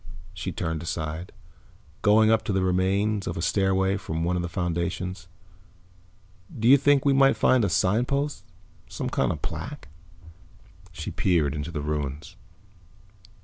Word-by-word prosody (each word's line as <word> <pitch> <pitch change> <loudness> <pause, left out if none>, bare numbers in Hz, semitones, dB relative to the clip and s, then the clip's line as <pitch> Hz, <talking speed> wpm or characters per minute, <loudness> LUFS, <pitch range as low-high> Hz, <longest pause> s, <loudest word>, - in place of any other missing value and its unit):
She 90 +1 -5
turned 80 -3 -3
aside, 80 +1 -4 0.7
going 110 +2 +5
up 110 -1 +3
the 100 -4 0
remains 95 +3 +1
of - - -3
a - - -2
stairway 95 0 +1
from 80 -3 -4
one 90 +2 0
of 90 - -1
the 85 - -4
foundations. 90 +1 -3 1.3
"Do 115 - +1
you 135 - +9
think 140 0 +3
we 140 - +4
might 135 0 +4
find 130 -3 +3
a 100 - +1
signpost? 125 - 0 0.5
Some - - -4
kind - - +1
of - - -6
plaque?" - - -6 1.0
She 85 -4 -6
peered 80 -7 +1
into 75 +2 -4
the 80 -3 -4
ruins. 75 +3 -4
95 Hz, 145 wpm, -25 LUFS, 85-110 Hz, 1.3 s, you